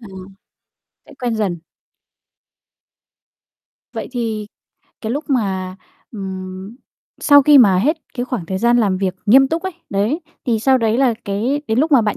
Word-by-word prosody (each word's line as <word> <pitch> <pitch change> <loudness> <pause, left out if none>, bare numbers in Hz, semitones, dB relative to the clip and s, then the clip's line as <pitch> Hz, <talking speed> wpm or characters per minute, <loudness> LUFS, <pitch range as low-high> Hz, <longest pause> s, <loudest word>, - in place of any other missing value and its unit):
Ừm, 190 -4 -11 0.8
sẽ - - -16
quen 240 -3 -1
dần. 185 -6 -2 2.3
Vậy - - -5
thì 220 -4 -3 0.5
cái 225 +1 -3
lúc 290 +3 -3
mà, 190 -6 -1 0.4
ừm, 190 +1 -7 0.4
sau 285 -1 +6
khi 290 0 +7
mà 195 -6 +5
hết 295 - +1 0.2
cái 245 - -2
khoảng 245 -10 -4
thời 190 +1 -3
gian 240 +2 +3
làm 200 -5 +1
việc 190 -1 -1
nghiêm 265 +5 +6
túc 325 +3 -2
ấy, 375 -1 -4 0.2
đấy, 210 - 0 0.3
thì 225 -3 +1
sau 265 +3 +3
đấy 225 0 +1
là 255 -4 +3
cái 235 +9 -1
đến 220 +2 0
lúc 305 +3 +1
mà 265 - +7
bạn 210 -2 -1
225 Hz, 165 wpm, -18 LUFS, 195-260 Hz, 2.3 s, khi